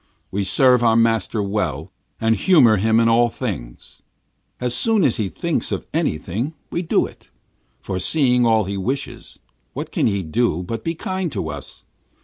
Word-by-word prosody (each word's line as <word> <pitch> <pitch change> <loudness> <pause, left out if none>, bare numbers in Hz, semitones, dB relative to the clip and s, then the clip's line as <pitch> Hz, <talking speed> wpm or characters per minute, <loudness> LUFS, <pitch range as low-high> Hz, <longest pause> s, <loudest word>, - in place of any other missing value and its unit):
We 100 +1 -1
serve 125 +5 +4
our 115 -2 +3
master 115 -2 +1
well, 90 -6 -3 0.3
and 115 0 +2
humour 125 - +5
him 110 +3 +2
in 115 - +3
all 120 +1 +4
things. 90 - -7 0.6
As 125 -1 -1
soon 220 - +3
as 130 - +2
he 105 -4 -1
thinks 80 - -2
of - - -3
anything, 110 - -2 0.2
we 170 - -1
do 170 - +1
it: - - -14 0.5
foreseeing 125 - +2
all 110 -2 +3
his 100 0 -4
wishes. 130 +8 -4 0.4
What - - -6
can - - +1
he 100 -3 -1
do 90 +1 0
but 115 +5 -5
be 165 - -2
kind 185 0 -3
to 80 - -3
us? 75 -2 -10
115 Hz, 165 wpm, -21 LUFS, 95-125 Hz, 0.6 s, humour